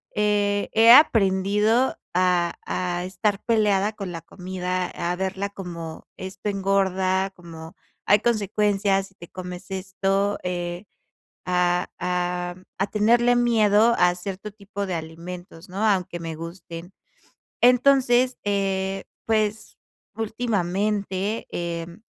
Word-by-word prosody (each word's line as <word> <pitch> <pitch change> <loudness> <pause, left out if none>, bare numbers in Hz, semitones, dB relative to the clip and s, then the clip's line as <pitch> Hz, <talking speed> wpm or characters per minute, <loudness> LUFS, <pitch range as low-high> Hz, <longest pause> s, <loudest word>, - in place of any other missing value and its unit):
eh, 205 -1 +1
he 225 +1 +7
aprendido 210 -1 +4 0.2
a 180 -2 +2
a 180 -1 -2
estar 195 +2 -1
peleada 210 -2 +2
con 200 -4 -6
la 165 - -6
comida, 180 +1 -3 0.3
a - - -1
verla 190 +1 -2
como 170 -5 -8
esto 190 +2 -5
engorda, 190 -1 +1
como 165 -1 -11 0.3
hay 205 +2 +5
consecuencias 205 -3 +1
si 190 - -25
te 170 - -12
comes 180 0 -8
esto, 195 +1 0
eh, 175 +1 -3 0.6
a 180 -1 +1
a 180 0 -2 0.2
a 195 - +1
tenerle 235 +4 +3
miedo 225 -1 +4
a 175 0 +4
cierto 195 +3 -6
tipo 200 -1 -6
de 185 - -2
alimentos, 170 +2 -8
¿no?, 195 +4 -3
aunque 185 -4 +1
me 165 -1 -5
gusten. 170 +1 -8 0.7
Entonces, 250 0 +4
eh, 195 -1 -1 0.2
pues, 215 -1 -1 0.4
últimamente, 205 -2 -1
em, 170 +3 -5
195 Hz, 115 wpm, -24 LUFS, 180-210 Hz, 0.7 s, he